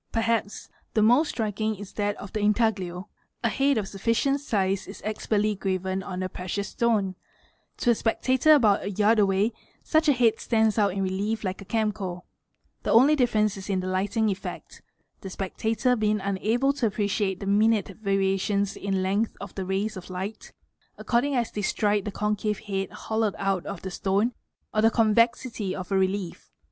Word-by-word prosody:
Perhaps 225 -2 -1 0.3
the 215 - +4
most 250 +8 +4
striking 215 -1 -2
is 200 -1 -10
that 205 -1 -1
of 200 - -10
the 215 - -1
intaglio: 205 -4 0 0.4
a - - +3
head 275 -1 +2
of 205 -3 -1
sufficient 230 +8 0
size 195 -7 0
is 195 - -9
expertly 215 0 0
graven 190 -1 -2
on 185 0 -5
a - - -1
precious 185 +2 -4
stone 215 -5 +1 0.6
to 240 - +2
a - - +5
spectator 260 +6 +3
about 215 -8 +4
a 200 - -3
yard 215 +3 +3
away 200 +2 +2 0.3
such 315 -1 +2
a - - +6
head 230 -3 +2
stands 220 -1 +2
out 200 -3 +2
in 195 0 -1
relief 205 +4 -2
like 185 -1 -3
¢ - - -20
cameo; 205 -5 -2 0.6
the - - -4
only 265 +7 +6
difference 215 -6 +1
is 195 +1 -8
in 190 -2 +1
the 185 - -4
lighting 200 +4 0
effect, 195 - -7 0.4
the 190 - -7
spectator 220 +6 0
being 215 -2 +1
unable 215 +8 +1
to 260 -5 0
appreciate 205 -2 -1
the 200 - -6
minute 210 +2 +3
variations 195 0 0
in 195 -1 -1
length 200 +4 0
of 200 -2 -8
the 190 - -4
rays 195 +3 -1
of 185 -1 -9
light. 190 +4 -6 0.5
according 260 +4 0
as 235 -2 0
they 210 - -3
strike 205 0 +1
the 210 - -3
concave 210 +1 -1
head 195 -2 -3
hollowed 220 -2 -2
out 195 -2 -1
of 200 -3 -6
the 190 - -5
stone 200 +6 +1 0.4
c 215 - +2
the 225 - +6
convexity 230 -2 +1
of 185 +1 -7
a - - +2
relief. 190 -1 -1
205 Hz, 180 wpm, -26 LUFS, 195-225 Hz, 0.6 s, a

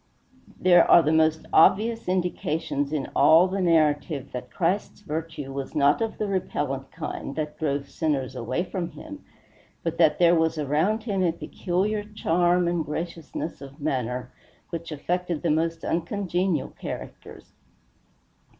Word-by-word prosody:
There 175 -2 +5
are 170 - +8
the 155 - +2
most 160 0 +2
obvious 225 +7 +4
indications 160 -5 -1
in 150 -3 -3
all 160 +5 +6
the 190 +1 -2
narrative 155 -4 +1
that 125 0 -6
Christ's 185 +7 -1
virtue 155 -5 -5
was 135 -1 -5
not 145 +5 +3
of 225 -1 -2
the 215 - -1
repellent 145 -8 -2
kind 135 - -6
that 150 -1 -4
drove 140 -2 -1
sinners 140 -3 -2
away 120 +9 -2
from 180 -2 -4
him, 295 -2 -10 0.6
but 165 0 -3
that 155 -3 +5
there 175 -1 +5
was 160 -1 +2
around 155 +10 +1
him 200 -4 -1
a 175 -2 +3
peculiar 190 +5 -2
charm 180 -4 +1
and 170 -1 0
graciousness 165 +1 -5
of 140 +2 -11
manner 125 -3 -2 0.4
which 170 -1 -5
affected 175 +2 -2
the 170 - +2
most 165 +1 0
uncongenial 180 -1 -1
characters. - - -9
165 Hz, 140 wpm, -25 LUFS, 150-180 Hz, 0.6 s, are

